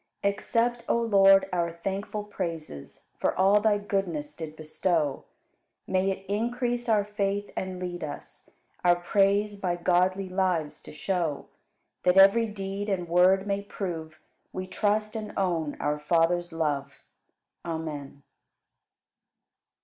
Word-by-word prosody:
58. 200 - +3
Accept, 235 +3 0
O - - +3
Lord, 195 -4 +5
our 170 -1 0
thankful 195 +4 -4
praises 165 - -6
For - - 0
all 195 +2 +5
Thy 210 -1 +3
goodness 185 -8 -2
did 155 -2 -7
bestow; 155 -2 -1 0.6
May 190 +1 +1
it 195 0 -4
increase 240 +3 -1
our 210 -2 +4
faith 205 -1 -2
and 185 -1 -4
lead 180 -1 -5
us 150 - -8 0.3
Our 175 -1 +5
praise 200 +3 +1
by 180 -2 0
godly 185 +2 +1
lives 185 -5 -1
to - - -9
show, 160 -1 -2 0.5
That 180 +1 +3
every 200 +4 +7
deed 200 0 -4
and 180 -3 -1
word 185 +3 +4
may 200 -1 -1
prove 165 -6 -6 0.3
We 185 - -4
trust 210 +3 0
and 215 -1 -5
own 170 -6 -1
our 150 0 -1
Father's 170 +3 +1
love. 145 -4 -1 0.7
Amen. 155 -4 -5
185 Hz, 130 wpm, -27 LUFS, 165-205 Hz, 0.7 s, every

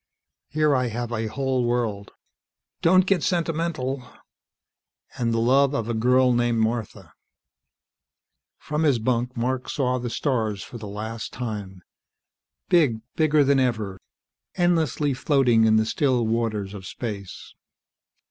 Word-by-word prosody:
"Here 150 -1 +2
I 125 -1 +1
have 120 +1 -4
a 115 -1 -2
whole 130 +1 -1
world 115 -4 -1 0.4
" - - -61
"Don't 185 +2 +5
get 195 -3 +2
sentimental 165 -6 -1 0.6
" - - -28
"And 115 -1 +1
the 115 - 0
love 135 +4 +3
of 115 -5 -2
a 120 - -1
girl 125 +3 +3
named 120 -1 +1
Martha." 110 - -2 1.4
From 150 +1 -3
his 145 -6 +3
bunk 120 +2 -1
Mark 125 +2 -2
saw 125 -2 0
the 120 0 -4
stars 110 -7 -1
for 120 - -9
the 105 - -7
last 110 +2 -6
time. 105 -6 -6 0.8
Big, 140 -11 +3
bigger 155 -2 +3
than 140 0 +3
ever, 110 -7 -1 0.5
endlessly 160 -5 +1
floating 125 -4 +3
in 110 0 +4
the 110 0 +3
still 125 +1 +1
waters 110 -3 -1
of 95 -3 -8
space. 100 -6 -7
120 Hz, 140 wpm, -24 LUFS, 110-140 Hz, 1.4 s, Don't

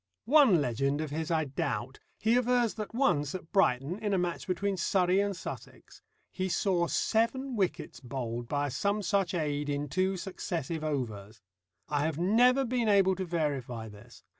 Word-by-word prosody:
One 260 - +6
legend 135 +3 0
of 155 -2 -3
his 160 +1 -3
I 160 -2 +1
doubt; 135 -3 -3 0.2
he 225 +2 +2
avers 245 -2 +2
that 215 +1 -6
once 150 - +1
at 175 -3 -8
Brighton, 165 - +2
in 210 -2 0
a - - +2
match 175 -1 -2
between 195 +2 -1
Surrey 185 +1 +2
and 200 -2 0
Sussex, - - -9 0.3
he 185 0 -2
saw 175 -2 +1
seven 245 +7 0
wickets 190 -5 -2
bowled 120 -2 -5
by 145 +1 -1
some 200 +10 -1
such 195 -3 +1
aid 145 -3 -1
in 145 0 -2
two 190 +4 0
successive 170 -4 -4
overs. 110 -8 -4 0.5
I 145 -1 0
have 160 -2 -3
never 245 +9 +4
been 240 -2 0
able 195 -2 +5
to 190 0 -3
verify 140 -9 -2
this. 105 +3 -15
175 Hz, 165 wpm, -30 LUFS, 145-200 Hz, 0.5 s, One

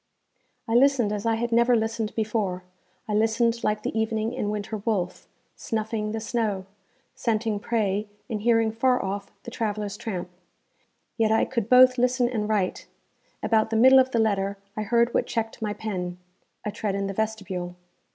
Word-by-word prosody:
I 225 - -1
listened 245 -3 +4
as 210 +1 -3
I 225 - +3
had 235 +1 -2
never 235 +1 +4
listened 225 -1 -1
before; 210 -5 -1 0.4
I 210 - -2
listened 230 +2 +2
like 210 0 0
the - - -3
evening 220 +1 -1
and 210 -5 -2
winter 210 +1 -3
wolf, 195 -4 -2 0.3
snuffing 220 -1 -3
the 225 - -3
snow, 215 -4 -2 0.5
scenting 225 -4 -1
prey, 210 -2 -1 0.2
and 220 -4 -3
hearing 225 -1 +3
far 250 +2 +1
off 200 +1 -4
the 240 - -8
traveller's 210 -2 -3
tramp. 180 -6 -5 0.9
Yet 220 -2 +2
I 220 - +3
could 235 -4 -3
both 255 0 +7
listen 250 0 +2
and 215 -3 -2
write. 200 -4 -1 0.6
About 220 -1 +2
the 225 - -2
middle 260 +3 +8
of 260 0 +3
the 240 - -1
letter 200 -3 +1 0.2
I 215 - -2
heard 235 +3 +2
what - - +1
checked 225 0 -3
my 215 -1 -1
pen 180 -5 -4 0.5
a 210 - -1
tread 205 -1 -2
in 200 0 -1
the 195 - -3
vestibule. 190 -4 -3
220 Hz, 170 wpm, -25 LUFS, 205-235 Hz, 0.9 s, middle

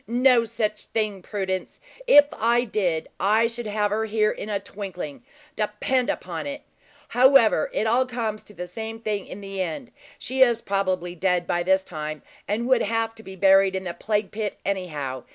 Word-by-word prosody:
"No 245 0 +4
such 215 -2 -2
thing, 210 -3 -2
Prudence. 190 -1 -4 0.3
If 290 -11 +9
I 235 +2 +2
did, 185 -8 -1
I 215 +4 +3
should 230 0 -3
have 210 -1 0
her 220 +1 0
here 215 0 +2
in 215 - -6
a 205 -1 0
twinkling, 190 - -7 0.3
depend 215 +4 0
upon 175 - -3
it. 285 0 -6 0.5
However, 250 - +5
it 215 - -1
all 245 +4 +2
comes 225 -4 -3
to 210 - -15
the 180 +1 -5
same 225 +5 -6
thing 210 -3 -3
in 200 - -8
the 195 -1 -5
end. 185 - -4 0.3
She 260 +1 -3
is 240 -3 +5
probably 185 -4 -1
dead 180 0 0
by 175 +1 0
this 190 +2 +2
time, 155 -4 -6 0.2
and 225 +4 -1
would 255 -2 +4
have 225 +1 0
to 225 - -12
be 190 -3 -10
buried 195 0 +5
in 190 - -2
the 175 -2 -4
plague 210 +1 -1
pit, 210 -1 -3
anyhow. 150 -10 -3
210 Hz, 185 wpm, -24 LUFS, 190-230 Hz, 0.5 s, If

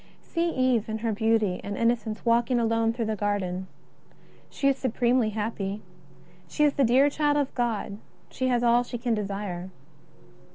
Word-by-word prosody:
See 340 0 -1
Eve 255 -7 +1
in 220 - -2
her 225 - +1
beauty 220 -3 +1
and 205 0 -4
innocence 230 -2 0
walking 240 +1 +3
alone 225 0 +2
through 230 0 -3
the 220 0 -1
garden. 190 -3 -2 0.8
She 275 - -1
is 275 - +4
supremely 245 -2 +1
happy. 210 -1 -3 0.6
She 300 - 0
is 295 -1 +4
the 280 - +2
dear 260 +4 +5
child 290 0 +1
of 285 -2 -1
God; 225 -4 -2 0.3
she 260 - -2
has 245 -1 +1
all 240 0 +4
she 245 - -6
can 235 0 -1
desire. 195 -3 -4
230 Hz, 165 wpm, -26 LUFS, 210-250 Hz, 0.8 s, dear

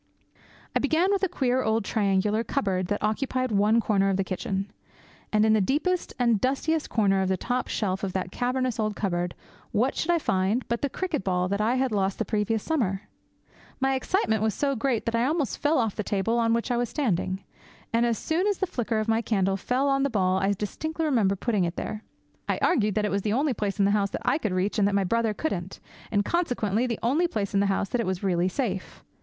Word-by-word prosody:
I - - +4
began 320 +7 +2
with 400 - +1
a 385 - +1
queer 260 -6 +1
old 220 -2 0
triangular 210 +1 +1
cupboard 190 -9 -1
that 205 +1 -2
occupied 255 +3 0
one 210 +3 +3
corner 200 -3 +2
of 190 - +1
the 195 - +1
kitchen. 190 +1 -3 0.6
And 215 0 +3
in 220 - +4
the 215 - +4
deepest 315 - 0
and 235 -4 +2
dustiest 295 +4 0
corner 195 -4 +2
of 190 - 0
the 190 - +1
top 250 +7 -2
shelf 190 -2 -2
of 195 - -1
that 185 -1 -2
cavernous 250 0 -1
old 215 -1 0
cupboard, 175 -3 -2 0.4
what 250 +6 +1
should 325 - -2
I 345 - +4
find 205 - 0
but 235 0 -1
the 285 - 0
cricket 350 - -2
ball 180 -1 0
that 200 +1 0
I 230 +4 +2
had 260 -1 +1
lost 195 -2 0
the - - -1
previous 215 0 0
summer? 215 - -1 0.8
My 270 0 +2
excitement 260 - 0
was 220 -2 +1
so 280 -1 0
great 240 -1 0
that 230 - -1
I 230 +1 +2
almost 300 -2 -1
fell 300 +2 +2
off 225 -5 0
the - - -2
table 210 +4 0
on 230 -1 +2
which 235 +2 -2
I 240 - +1
was 240 -1 0
standing. 195 - -1 0.5
As 235 -1 +2
soon 340 - 0
as 405 -2 +1
the 380 - 0
flicker 240 - -2
of 215 +1 -1
my 225 0 +2
candle 195 -4 +1
fell 250 +8 0
on 275 0 +2
the 280 - +2
ball 190 -5 +1
I 195 +1 +2
distinctly 315 - -3
remembered 210 -10 +1
putting 215 -6 +1
it 170 0 -2
there. 215 0 -5 0.5
I - - +1
argued 215 - +2
that 215 - +1
it 210 - -1
was 200 - 0
the 210 +1 -1
only 275 +3 +1
place 205 -3 -2
in 200 - +3
the 200 - +3
house 200 -1 +2
that - - -6
I 295 - +2
could 215 -9 -2
reach, 185 +4 0
and 200 - +4
that 200 - 0
my 200 - +3
brother 225 +2 0
couldn't, 190 - -3 0.3
and 205 -1 +1
consequently 245 - 0
the 230 -3 -2
only 295 +9 +2
place 210 - -3
in 200 - +3
the 200 - +2
house 195 0 0
that 245 -2 0
was 185 -1 -3
really 180 -1 +1
safe. 195 -4 -3
220 Hz, 230 wpm, -26 LUFS, 195-255 Hz, 0.8 s, I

